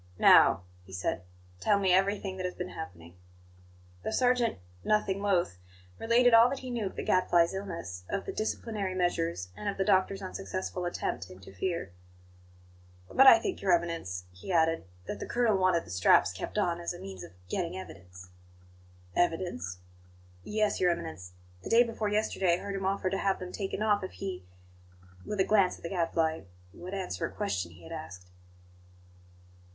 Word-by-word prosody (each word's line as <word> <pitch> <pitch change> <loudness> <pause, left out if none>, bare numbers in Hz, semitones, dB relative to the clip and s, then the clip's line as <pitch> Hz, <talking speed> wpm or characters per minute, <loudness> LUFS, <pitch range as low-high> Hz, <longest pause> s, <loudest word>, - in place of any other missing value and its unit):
"Now," 90 - +6 0.2
he 95 - -16
said, 95 - -2 0.4
"tell 205 - +3
me 190 -2 +3
everything 195 0 +1
that 185 - -3
has 180 - -7
been 180 0 -5
happening." 85 - -9 0.9
The - - -3
sergeant, 245 - +2 0.3
nothing 200 -2 +1
loath, 180 - +1 0.4
related 235 +1 +4
all 230 +2 +8
that 275 - -3
he 255 -1 -6
knew 230 -4 -1
of - - -8
the - - -4
Gadfly's 175 -2 +3
illness, 170 - -6
of 195 - -2
the - - -4
"disciplinary 215 -3 -3
measures," 90 - -1
and 210 - -3
of 200 - -4
the 195 - 0
doctor's 195 0 +2
unsuccessful 185 -1 -4
attempt 90 - -3
to 90 - -11
interfere. 95 - -4 1.2
"But 270 - +6
I 230 - +11
think, 225 - -4
Your 190 -2 +3
Eminence," 165 - -1
he 90 - -8
added, 165 - +2 0.2
"that - - -5
the - - -5
colonel 235 -3 +2
wanted 185 -3 +2
the - - -10
straps 90 -1 +4
kept 95 - -6
on 175 -4 +1
as 170 +1 -3
a - - -10
means 95 -2 -8
of 85 - -12
getting 175 - -2
evidence." 90 - -11 0.9
"Evidence?" 165 - -1 0.7
"Yes, 215 0 0
Your 180 - +4
Eminence; 160 - -4 0.3
the - - -7
day 235 +1 +6
before 225 -3 -3
yesterday 205 -4 +1
I - - -7
heard 200 0 -4
him 195 -1 -3
offer 190 -1 0
to 195 - -1
have 195 -1 +1
them 180 -1 -7
taken 200 +1 -3
off 210 -2 +2
if 185 - -6
he" 190 - -6 0.8
with 210 - -3
a - - +6
glance 200 -4 +3
at - - -20
the 170 - -4
Gadfly 165 -3 0 0.3
"would 185 +3 -7
answer 190 -2 -3
a - - -12
question 90 - -3
he 85 +1 -16
had 80 - -11
asked." 90 +2 -8
185 Hz, 175 wpm, -30 LUFS, 160-200 Hz, 1.2 s, I